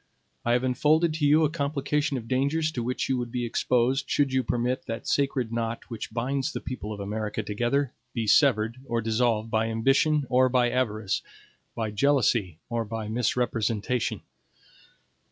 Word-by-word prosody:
I 120 - +2
have 125 +1 +2
unfolded 155 +6 +2
to 150 -2 +1
you 155 +2 +5
a - - +1
complication 145 -1 -1
of 115 -2 -7
dangers 140 +5 +1
to 125 - -3
which 125 +2 -2
you 130 -2 0
would 120 -1 -4
be 125 -1 -2
exposed, 125 +4 +1
should 140 -2 +1
you 130 - +3
permit 125 +1 -1
that 115 +1 -5
sacred 135 -5 0
knot 115 +1 -3
which 115 -2 -5
binds 135 +4 -1
the - - -4
people 125 -4 -6
of 105 - -6
America 105 +1 -3
together 120 +6 0 0.2
be 115 -2 -2
severed 115 0 +3
or 115 -2 0
dissolved 115 0 0
by 110 0 +1
ambition 135 +6 +2
or 130 +1 +4
by 125 -1 +2
avarice, 110 -5 -1 0.5
by 110 -2 -2
jealousy 115 - +2
or 115 -1 -1
by 110 -1 -5
misrepresentation. 115 0 0
125 Hz, 165 wpm, -27 LUFS, 115-135 Hz, 0.5 s, you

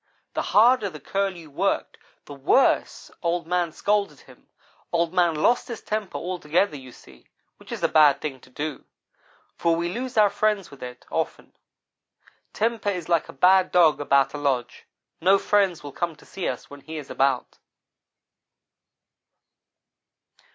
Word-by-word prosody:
The - - -1
harder 225 -1 +4
the 155 -4 -10
Curlew 185 -2 -3
worked, - - -1 0.3
the 145 - -9
worse 140 - +1
Old 170 -1 -1
man 175 -1 0
scolded 205 +4 -1
him. - - -19 0.4
Old 170 0 0
man 175 -3 +3
lost 235 +11 +2
his 235 -3 -6
temper 215 -2 -3
altogether, 175 0 0
you 130 -2 -10
see, 65 - -18 0.3
which - - -15
is - - -5
a - - +5
bad 150 -3 +5
thing 135 -3 -5
to 130 - -19
do, 145 +2 -5 0.7
for 170 -1 +2
we 170 +1 -2
lose 250 +1 -5
our 210 -2 +5
friends 205 -2 0
with 140 - -14
it, 125 0 -9
often. - - -3 1.0
Temper 225 -1 -1
is 180 -4 -4
like 170 -2 +1
a - - -9
bad 185 +6 +4
dog 165 -5 +4
about 140 -1 +2
a 145 - -5
lodge 130 -4 -2 0.3
no 190 +3 +5
friends 195 -5 +1
will 145 - -7
come 170 +3 -3
to - - -19
see 190 - -5
us 125 - -4
when 145 0 -12
he 160 +3 -8
is 145 -3 -8
about. 135 -2 0
170 Hz, 160 wpm, -24 LUFS, 145-195 Hz, 1.0 s, a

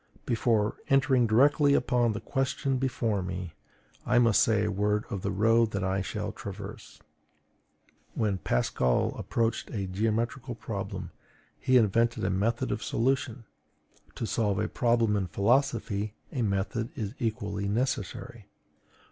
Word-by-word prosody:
Before 110 -2 +1
entering 135 -3 +4
directly 140 +5 +4
upon 120 -2 +2
the 110 - -4
question 135 +1 -1
before 115 -6 0
me, 90 -2 -5 0.5
I 125 - +2
must 115 -3 +5
say 110 -2 +3
a 105 - 0
word 105 +2 0
of 100 -4 -3
the - - -2
road 115 +3 +3
that 100 0 -1
I 95 +1 0
shall 95 - -4
traverse. - - -9 1.2
When 100 -4 0
Pascal - - +1
approached 115 0 -1
a 100 -4 -3
geometrical 115 +6 -1
problem, 100 -5 -5 0.5
he 130 -1 +4
invented 115 0 +2
a 95 - +1
method 115 +7 0
of - - -2
solution; 120 +1 -1 0.7
to - - -3
solve 105 -3 0
a 105 +2 0
problem 115 -3 +2
in 95 -2 0
philosophy 105 -1 0 0.2
a 130 - -2
method 110 +3 -1
is 105 -2 -4
equally 105 -3 -2
necessary. 110 -1 -3
110 Hz, 135 wpm, -28 LUFS, 100-120 Hz, 1.2 s, must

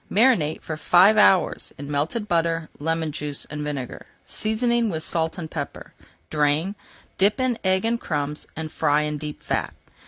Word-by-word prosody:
Marinate 205 - +3
for 155 - -4
five 185 +6 +5
hours 195 -3 +4
in 140 +1 -7
melted 160 +10 -1
butter, 165 -2 0
lemon 160 +1 -1
juice, 145 -1 -4
and 150 0 -4
vinegar, 140 -4 -5 0.2
seasoning 235 +1 +1
with 160 -4 -3
salt 160 0 -1
and 160 -3 -6
pepper. 145 -3 -6 0.4
Drain, 150 +5 +1 0.5
dip 205 +6 +4
in 255 -2 0
egg 190 +1 +2
and 235 +1 0
crumbs, 150 -1 -3
and 155 0 -5
fry 150 -1 +2
in 150 -1 -2
deep 150 0 -6
fat. - - -2
160 Hz, 160 wpm, -24 LUFS, 150-200 Hz, 0.5 s, five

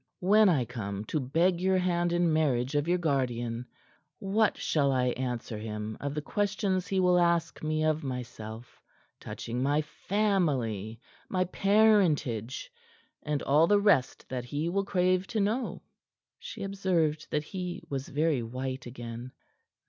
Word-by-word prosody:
When 205 +3 +5
I 140 -8 +2
come 105 -4 -5
to 155 - +2
beg 170 +7 +1
your 190 0 +3
hand 175 -1 +1
in 175 -2 +2
marriage 135 -4 +1
of 145 +1 +1
your 175 +1 +3
guardian, 125 -6 -1 0.5
what 205 +2 +1
shall 140 -3 +1
I 125 -1 +2
answer 120 -3 -3
him 105 0 -5
of 145 0 -4
the 150 - -3
questions 200 -1 -1
he 195 - 0
will 180 -1 +4
ask 170 -1 +1
me 155 0 0
of 155 0 +1
myself 120 -3 -7 0.4
touching 120 +2 -5
my 145 +3 +2
family, 145 - -1 0.3
my 185 -1 +1
parentage 180 - +2 0.5
and 150 -2 -2
all 150 +4 +4
the 205 +2 +4
rest 175 -11 +2
that 125 -2 -4
he 145 +6 -2
will 195 +2 0
crave 185 -1 +1
to 225 - -2
know?" 220 +5 -1 0.6
She 485 - -7
observed 180 -6 0
that 150 - -1
he 180 +1 -5
was 135 -1 -4
very 150 -2 +1
white 130 +3 -5
again. 120 0 -7
155 Hz, 150 wpm, -29 LUFS, 125-185 Hz, 0.6 s, When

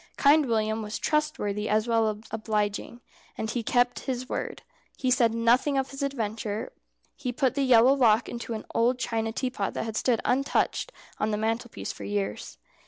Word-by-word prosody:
Kind 290 0 +5
William 220 -1 0
was 210 0 -4
trustworthy 300 -10 -1
as 215 +2 +2
well 225 -2 +3
as 215 0 -5
obliging, 215 +1 -2 0.4
and 220 0 -2
he 240 - -1
kept 245 +2 +2
his 255 0 -2
word. - - -4 0.3
He 255 -1 0
said 240 -2 +4
nothing 245 +5 +3
of 270 0 -1
his 275 - -7
adventure. 225 - -3 0.4
He 255 -4 -3
put 260 0 +1
the 280 - -1
yellow 255 -1 +6
lock 230 -4 +4
into 235 -1 -5
an 215 - -6
old 240 +2 +2
china 225 -2 -1
teapot 250 -4 -2
that - - -2
had 220 -1 -5
stood 235 -1 +2
untouched 275 - +1 0.3
on 215 - +1
the 210 - 0
mantelpiece 225 +2 -2
for - - -10
years. 205 -1 -3
230 Hz, 175 wpm, -27 LUFS, 220-255 Hz, 0.4 s, yellow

